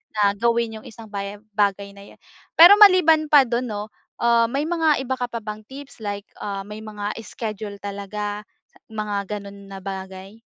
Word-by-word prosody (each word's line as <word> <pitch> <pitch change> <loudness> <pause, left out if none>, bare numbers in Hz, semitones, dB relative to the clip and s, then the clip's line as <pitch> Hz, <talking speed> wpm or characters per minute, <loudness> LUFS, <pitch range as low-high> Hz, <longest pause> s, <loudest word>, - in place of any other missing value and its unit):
na 205 -1 +3
gawin 230 +1 0
yung - - -18
isang 225 -2 -12
bagay, 200 0 -5
bagay 200 -1 0
na 200 0 -14
yun. - - -36 0.4
Pero, 360 +5 +9
maliban 345 -6 +7
pa 290 -2 +7
dun 245 0 -2
'no, 210 -1 -5 0.3
uh, 235 -1 +4
may 275 +5 -1
mga 320 -4 +1
iba 260 0 -2
ka 245 - -1
pa 230 -2 -6
bang 215 0 -6
tips, 275 0 -11
like, 205 -1 -5
uh, 200 -1 -4
may 210 +2 -9
mga 210 -1 -5
schedule 215 -2 -6
talaga 205 +1 -5 0.4
mga 210 -2 -3
ganun 200 -1 -7
na 195 -1 -9
bagay? 190 +2 -8
210 Hz, 175 wpm, -23 LUFS, 200-235 Hz, 0.4 s, Pero